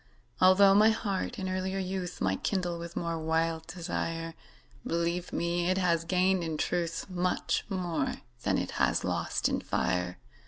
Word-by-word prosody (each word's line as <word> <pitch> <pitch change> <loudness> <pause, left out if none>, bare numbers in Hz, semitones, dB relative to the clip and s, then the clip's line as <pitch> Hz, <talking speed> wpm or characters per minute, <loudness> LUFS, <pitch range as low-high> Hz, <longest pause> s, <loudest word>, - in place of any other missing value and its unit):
Altho' 190 +1 +7
my 210 +2 +7
heart 220 +1 -1
in 190 -3 -3
earlier 185 +1 -2
youth 185 -2 -3
Might 95 0 0
kindle 180 -4 -1
with 170 0 -7
more 170 -1 -2
wild 160 0 0
desire, 165 -1 -3 0.5
Believe 170 +1 -1
me, 170 +1 0
it 185 - +2
has 170 -3 +2
gained 185 +1 +2
in 160 -2 -2
truth 170 0 -1
Much 180 -1 0
more 175 -7 -1 0.3
than - - +1
it - - -2
has - - +2
lost - - 0
in - - -1
fire. 90 0 -1
175 Hz, 155 wpm, -30 LUFS, 165-185 Hz, 0.5 s, Altho